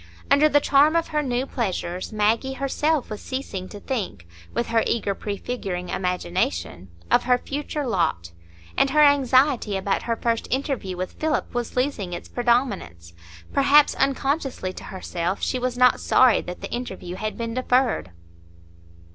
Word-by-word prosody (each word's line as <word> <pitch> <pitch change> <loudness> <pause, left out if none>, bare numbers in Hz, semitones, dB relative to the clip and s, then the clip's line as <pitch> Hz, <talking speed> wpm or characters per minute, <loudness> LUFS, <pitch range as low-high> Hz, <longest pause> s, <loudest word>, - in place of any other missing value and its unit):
Under 290 +2 +6
the 290 - +5
charm 290 +3 +4
of 335 - +1
her 300 -1 0
new 255 -2 -1
pleasures, 185 -8 -3
Maggie 220 +5 +1
herself 280 +2 0
was 210 - -5
ceasing 200 -8 -5
to 205 - -9
think, 195 - -4 0.3
with 240 - -1
her 230 0 +3
eager 205 -3 0
prefiguring 195 -3 -4
imagination, 175 - -2 0.2
of - - +4
her 250 0 +4
future 290 +2 -4
lot; 165 - -1 0.4
and 275 - +3
her 300 +2 +5
anxiety 265 -6 +3
about 195 +1 -1
her 230 - -1
first 230 0 -1
interview 260 -8 -2
with 185 0 -3
Philip 310 -1 -1
was 240 -1 -3
losing 250 -9 -1
its - - -6
predominance; 235 - -1 0.4
perhaps, 285 +1 +5
unconsciously 270 - -1
to - - -10
herself, 185 0 -3
she 255 - 0
was 250 0 -2
not 250 0 +5
sorry 255 -3 +4
that 180 - -8
the - - -6
interview 190 -7 -5
had 215 +1 -4
been 230 -1 -3
deferred. 250 - +1
240 Hz, 155 wpm, -24 LUFS, 190-270 Hz, 0.4 s, Under